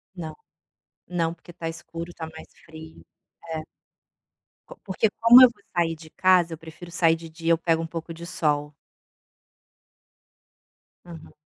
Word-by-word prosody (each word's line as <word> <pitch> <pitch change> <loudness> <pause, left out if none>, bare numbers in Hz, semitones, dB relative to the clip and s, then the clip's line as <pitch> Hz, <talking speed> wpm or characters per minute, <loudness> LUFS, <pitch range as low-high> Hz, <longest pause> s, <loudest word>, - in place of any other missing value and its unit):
Não. 160 -4 -7 0.7
Não, 165 -2 -1
porque 175 +1 -15
tá 165 -1 -5
escuro, 165 +1 -7
tá 160 - -6
mais 160 0 -12 0.2
frio. 160 0 -12 0.5
É. 155 - -3 1.1
Co - - -12
porque, 200 +3 0
como 235 +2 +9
eu 255 - +10
vou 205 - -27
sair 165 -1 +1
de 160 0 -14
casa, 180 -1 +3
eu - - -6
prefiro 165 +2 -12
sair 165 -1 +3
de 165 0 -10
dia, 165 +1 -2
eu 165 - +5
pego 165 0 +1
um 165 - -5
pouco 165 0 -6
de 170 +1 -9
sol. 150 -4 -1 2.3
Uhum. 165 -3 -12
165 Hz, 150 wpm, -25 LUFS, 160-175 Hz, 2.3 s, eu